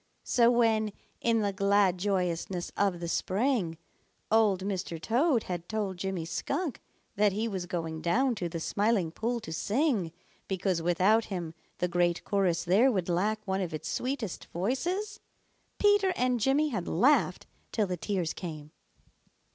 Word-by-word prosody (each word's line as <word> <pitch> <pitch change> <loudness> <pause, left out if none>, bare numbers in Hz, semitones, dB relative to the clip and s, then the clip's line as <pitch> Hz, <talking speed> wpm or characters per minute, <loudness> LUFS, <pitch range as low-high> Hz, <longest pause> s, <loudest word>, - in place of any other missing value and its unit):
So 235 -1 +4
when, 220 -3 +2 0.3
in 230 -1 +2
the 200 -1 0
glad 200 -2 +3
joyousness 180 -2 -1
of 195 -4 +1
the 170 - -4
spring, 190 - 0 0.5
Old 210 -4 +3
Mr. 185 -4 -3
Toad 245 - +2
had 175 -1 -5
told 205 -4 -2
Jimmy 185 -2 -3
Skunk 275 - -3 0.4
that 205 -1 +3
he 220 +3 -1
was 190 -5 -4
going 165 -3 -4
down 250 +10 +2
to 180 -6 -3
the 165 - -4
Smiling 200 -1 +1
Pool 235 +7 -2
to 160 - -6
sing 215 - 0 0.4
because 190 -2 0
without 185 +7 +3
him 175 -5 -5 0.2
the 180 - 0
great 175 0 +1
chorus 185 -4 +1
there 205 +10 +4
would 185 -6 -1
lack 210 +5 0
one 190 -1 -1
of 175 -4 -3
its 155 +1 -5
sweetest 250 -7 -3
voices, 345 - -2 0.6
Peter 410 -2 +4
and 250 -3 +1
Jimmy 275 +6 +2
had 195 -10 -3
laughed 265 - +3 0.3
till 215 - +1
the 185 -2 -2
tears 180 -2 -2
came. 155 -4 -7
195 Hz, 155 wpm, -29 LUFS, 175-230 Hz, 0.6 s, So